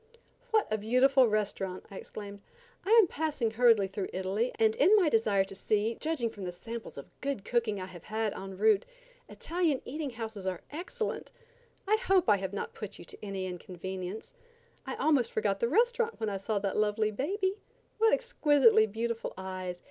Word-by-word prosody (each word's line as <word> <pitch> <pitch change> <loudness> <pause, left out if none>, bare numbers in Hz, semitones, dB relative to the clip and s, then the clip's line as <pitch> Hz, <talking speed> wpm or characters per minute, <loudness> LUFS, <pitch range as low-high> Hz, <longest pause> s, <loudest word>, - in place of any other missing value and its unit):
"What 435 -1 +2
a 215 - +1
beautiful 255 +4 +4
restaurant!" 200 -3 -2
I 195 - -8
exclaimed. 200 -1 -8 0.4
"I - - -5
am 435 - +7
passing 300 -8 -1
hurriedly 225 -3 +4
through 190 0 -4
Italy 190 +6 -1
and 440 0 +3
in 430 -4 +6
my 370 -7 +4
desire 215 -5 +3
to 195 - -6
see, 215 +3 0
judging 300 -8 -1
from 205 - -9
the 180 - -3
samples 225 +4 -8
of 140 - -9
good 275 -7 -3
cooking 230 -4 0
I 185 - -4
have 180 -3 -12
had 215 -1 -1
en 195 0 -8
route, 215 0 +4 0.5
Italian 330 -5 0
eating 295 +2 -4
houses 220 -5 -6
are 185 -2 -2
excellent. 355 +8 -4 0.6
I 430 +2 +4
hope 390 - +2
I 205 - +6
have 190 -1 -4
not 200 - -4
put 210 - -7
you - - -11
to - - -12
any 195 -2 -3
inconvenience. 185 +2 -6 0.5
I 265 - -3
almost 280 -4 +2
forgot 200 -2 0
the 235 - +1
restaurant 470 - +2
when 220 - -1
I 200 - -2
saw 205 +2 -2
that 200 -1 -1
lovely 215 0 +1
baby. 380 - -1 0.4
What 445 0 +5
exquisitely 290 - +4
beautiful 230 +2 -3
eyes! 185 -1 -5
220 Hz, 180 wpm, -30 LUFS, 195-290 Hz, 0.6 s, am